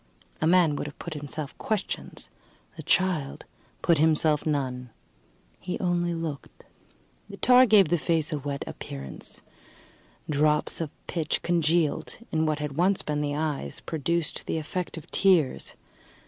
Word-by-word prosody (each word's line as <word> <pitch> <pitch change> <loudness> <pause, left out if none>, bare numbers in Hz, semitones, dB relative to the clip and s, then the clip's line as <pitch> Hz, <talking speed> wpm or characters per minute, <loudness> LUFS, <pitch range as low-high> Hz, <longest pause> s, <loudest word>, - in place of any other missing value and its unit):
A 160 - +3
man 170 -3 +4
would - - -3
have 145 - -10
put 170 - -6
himself 150 0 -6
questions; 215 -3 -3 0.4
the - - -7
child 175 -7 0 0.4
put 170 -4 +4
himself 155 -1 +3
none 130 -4 -1 0.7
he 180 - -4
only 175 -1 0
looked. 160 -4 -6 0.7
The - - -9
tar 250 0 +6
gave 200 -6 +6
the 175 0 +2
face 160 +2 0
a 150 - -1
wet 140 0 -4
appearance; 70 -1 -4 0.8
drops 150 +2 +1
of 160 - -2 0.2
pitch, 160 -3 -2
congealed 170 -2 +1
in 160 0 +1
what 155 -1 +1
had 150 -2 -4
once 185 +3 +3
been 150 -1 -1
the 145 -1 -1
eyes, 150 - -3
produced 165 +1 -2
the - - -1
effect 170 +3 -4
of 160 - -8
tears. 180 -9 +2
155 Hz, 145 wpm, -27 LUFS, 145-175 Hz, 0.8 s, tar